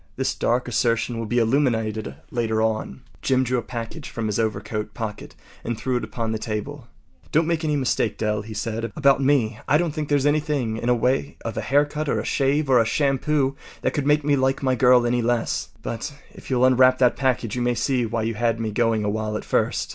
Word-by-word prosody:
This - - -1
dark 125 +1 0
assertion 115 0 0
will 115 - -3
be 120 - -1
illuminated 110 - +1 0.2
later 115 -2 0
on. 110 -11 -1 0.2
Jim 130 -1 +2
drew 125 0 0
a - - -3
package 120 +6 -7
from 115 - -4
his 105 0 -1
overcoat 105 0 -2
pocket 110 -2 -6 0.3
and 120 -1 -3
threw 130 +1 -1
it 120 - -4
upon 110 +1 -3
the 110 - -2
table. 120 +5 -5 0.4
“Don’t 160 +2 +3
make 165 0 -1
any 150 -1 +1
mistake, 125 -5 0
Dell,” 105 -1 -1
he 110 0 -9
said, 115 +1 -3
“about 140 -2 +4
me. 125 -5 +2
I 150 - +4
don’t 170 -2 -1
think 150 -1 -4
there’s 145 -2 +2
anything 145 -6 0
in 120 - -4
the 125 - +4
way 130 +4 0
of 115 - -3
a - - -2
haircut 145 +2 +1
or - - +1
a - - -4
shave 140 +2 +1
or 130 -2 +5
a - - +5
shampoo 135 +2 +1 0.3
that - - +1
could 145 -1 -1
make 150 0 +3
me 145 -1 +3
like 135 0 0
my 130 -1 +2
girl 125 -1 +5
any 120 0 +1
less. 120 0 -1
But 115 +6 -4 0.2
if - - -13
you’ll 130 -1 +3
unwrap 130 0 +5
that 125 -2 +3
package 125 -5 0
you 125 - -2
may 120 0 +1
see 130 0 +1
why 115 0 -2
you 115 +1 -1
had 115 +1 0
me 110 -1 -2
going 115 -1 +1
a 105 - 0
while 105 0 -2
at - - -8
first. - - 0
120 Hz, 225 wpm, -23 LUFS, 110-135 Hz, 0.4 s, or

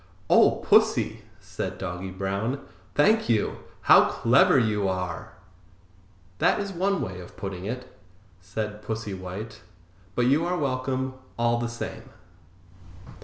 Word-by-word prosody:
"Oh, - - +5
Pussy!" - - +3 0.2
said - - -5
Doggy 95 0 -5
Brown. 100 +8 -2 0.3
"Thank 215 - +4
you; 110 -3 +1 0.2
how - - +7
clever 125 +3 +4
you 105 -5 +2
are!" 90 -1 -4 1.1
"That - - +3
is 200 -1 -3
one 195 +2 0
way 95 0 -5
of 90 - -12
putting 95 -2 -5
it," 125 +4 -6 0.4
said 105 +4 -5
Pussy 110 -2 -4
White; 95 +4 -7 0.5
"but 120 - +2
you 140 +6 +3
are 180 +1 0
welcome, 130 -2 -1 0.2
all 120 0 +2
the 120 0 -2
same." 115 -1 -7
115 Hz, 125 wpm, -26 LUFS, 95-130 Hz, 1.1 s, how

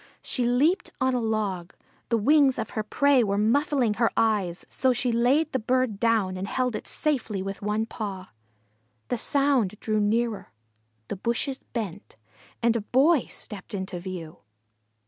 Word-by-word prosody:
She 245 -3 -1
leaped 290 +10 +2
on 260 0 +2
a 250 - +1
log. 205 -5 -2 0.3
The 230 - +3
wings 275 +3 +4
of 220 -2 -4
her 215 - -2
prey 270 +4 +3
were 200 -2 0
muffling 245 +1 +2
her 230 +2 +2
eyes, 205 -6 +1
so 260 -1 +1
she 245 0 0
laid 260 +7 +2
the 260 - 0
bird 250 -2 0
down 215 -5 +1
and 190 +2 -4
held 250 -1 -1
it - - -6
safely 230 -10 -1
with 195 0 -6
one 210 +2 0
paw. 200 -5 -6 0.8
The - - 0
sound 265 -9 +2
drew 215 -1 0
nearer, 220 +1 0 0.5
the - - -4
bushes 235 +6 -2
bent, 205 -4 -5 0.5
and 235 0 +3
a 230 - 0
Boy 270 +7 +3
stepped 205 -1 -6
into 190 -1 -4
view. 175 -3 -7
225 Hz, 160 wpm, -26 LUFS, 205-255 Hz, 0.8 s, wings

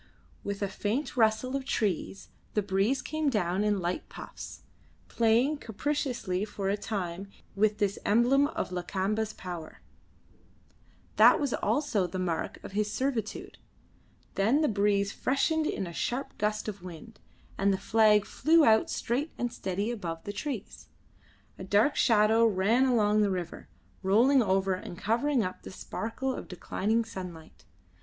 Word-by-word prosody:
With 200 0 -3
a - - +1
faint 210 +8 -2
rustle 230 +2 +2
of 275 - -2
trees 125 - -2 0.3
the 210 - +2
breeze 195 +7 +1
came 310 -1 -1
down 195 -4 0
in 210 -1 +1
light 175 0 -3
puffs, - - -9 0.5
playing 235 +6 +2
capriciously 235 -6 -2
for 200 -2 -3
a 200 - +2
time 195 -3 -4 0.3
with 210 +1 +2
this 205 -2 0
emblem 250 +6 +4
of 295 - -4
Lakamba's 195 +4 -1
power, 175 -3 -8 1.3
that - - +7
was 285 -5 -1
also 225 -11 0
the 185 - -6
mark 175 -3 -2
of - - -8
his 210 +1 -1
servitude; 235 -3 -3 0.7
then 225 +10 +2
the 305 - +3
breeze 200 -1 +1
freshened 310 +6 0
in 190 - -2
a 170 - -7
sharp 250 +10 -3
gust 210 +1 -1
of 205 -3 -5
wind, 185 +5 -11 0.4
and 200 +1 +2
the 190 - +1
flag 215 +1 +4
flew 320 0 +3
out 220 0 +4
straight 275 +7 -2
and 245 -1 -2
steady 200 +2 -2
above 170 -8 -5
the 205 - -5
trees. 230 -1 -6 0.7
A - - -6
dark 205 +9 +3
shadow 220 0 +4
ran 225 +4 +3
along 215 -4 +3
the 205 - +3
river, 180 -3 -5 0.3
rolling 235 +8 +4
over 195 -2 +1
and 185 -1 -7
covering 240 +5 +1
up 185 -1 -5
the - - -9
sparkle 230 +7 -4
of - - -7
declining 215 +5 -1
sunlight. 180 -6 -9
210 Hz, 150 wpm, -29 LUFS, 190-240 Hz, 1.3 s, that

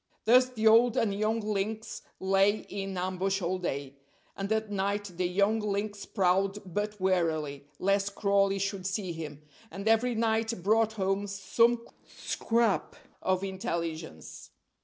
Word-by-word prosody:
Thus 250 +3 +6
the 225 -3 -3
old 230 +2 +6
and 210 -3 +2
young 215 +3 0
lynx 215 +1 -3 0.2
lay 195 +2 +3
in 195 -1 -4
ambush 185 +2 -1
all 185 0 -1
day. 140 -5 -4 0.4
And 195 +1 -4
at 220 -1 0
night 200 0 -1
the 180 +1 0
young 200 +5 +2
lynx 205 0 -3
prowled, 195 0 +1 0.2
but 210 +1 -2
warily, 160 -6 0
lest 200 +1 +1
Crawley 200 -1 +2
should 195 -1 -2
see 195 -2 -2
him; 150 -2 -7 0.3
and 195 +3 -6
every 225 +2 +3
night 225 -3 0
brought 220 +2 +3
home 195 -1 -1
some 230 +5 +1 0.2
scrap 230 -3 -1 0.3
of 185 0 0
intelligence. 170 - -5
195 Hz, 140 wpm, -29 LUFS, 185-220 Hz, 0.4 s, Thus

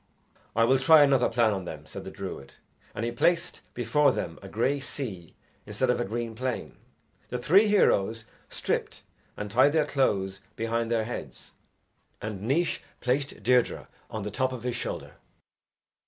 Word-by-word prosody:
"I 115 - +4
will 130 +3 +4
try 155 +2 +7
another 135 -3 +4
plan 115 -2 +3
on 95 -2 -4
them," 75 -3 -7
said - - -8
the - - -5
druid; 70 - -8 0.4
and 115 - -2
he 120 - -1
placed 170 +8 +1
before 130 +4 +3
them 85 -8 -4
a 100 - -9
grey 130 +8 +1
sea 105 - -6 0.3
instead - - +1
of - - -1
a - - 0
green 115 +2 -3
plain. 125 +2 -4 0.5
The 125 - -2
three 190 - +5
heroes 115 - +3 0.2
stripped - - -2 0.3
and 105 -1 -5
tied 130 +6 +5
their 155 -2 +3
clothes 100 -8 0
behind 115 0 -1
their 115 -1 +1
heads, 120 +3 -7 0.7
and 105 -3 -5
Naois 140 +11 +1 0.2
placed 130 -3 -1
Deirdre 125 +2 +2 0.2
on 110 -2 -5
the 105 - -4
top 130 -1 0
of 125 -3 -6
his 125 -1 -2
shoulder. - - -5
120 Hz, 165 wpm, -27 LUFS, 110-135 Hz, 0.7 s, try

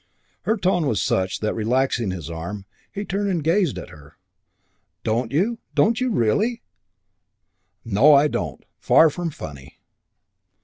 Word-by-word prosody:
Her 220 - +1
tone 180 -5 +1
was 110 -8 0
such 95 +2 -1
that, 110 - 0
relaxing 120 0 0
his 90 -4 -5
arm, 85 +5 -6 0.3
he 205 +1 -5
turned 200 +1 -1
and 170 -5 -1
gazed 170 -1 +1
at - - -8
her. 75 0 -16 0.9
"Don't 115 +1 -1
you? 215 +10 0 0.2
Don't 220 - +3
you 255 - +1
really?" 215 - +1 1.2
"No, 115 +8 +5
I 140 +2 +5
don't. 75 - -4
Far 160 -1 +5
from 175 +2 -3
funny." 70 - -10
135 Hz, 140 wpm, -22 LUFS, -, 1.2 s, No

